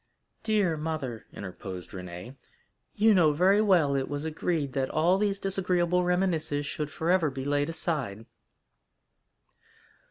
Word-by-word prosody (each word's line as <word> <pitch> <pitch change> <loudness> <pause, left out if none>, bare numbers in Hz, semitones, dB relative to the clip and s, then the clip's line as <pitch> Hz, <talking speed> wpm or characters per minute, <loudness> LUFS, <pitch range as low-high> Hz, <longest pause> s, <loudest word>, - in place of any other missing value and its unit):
"Dear 205 -7 +1
mother," 150 -7 -4
interposed 95 -1 -8
Renée, 90 +6 -8 0.6
"you 220 +1 +5
know 165 -6 +4
very 190 +7 +4
well 175 -9 +4
it 135 -1 -1
was 145 +1 -4
agreed 155 -3 -2
that 135 0 -1
all 175 +5 +2
these 200 -1 +1
disagreeable 180 -2 +1
reminiscences 165 -5 0
should 150 +1 -3
forever 170 0 +1
be 130 0 -6
laid 145 +1 +1
aside." 135 - -3
160 Hz, 125 wpm, -28 LUFS, 135-180 Hz, 0.6 s, you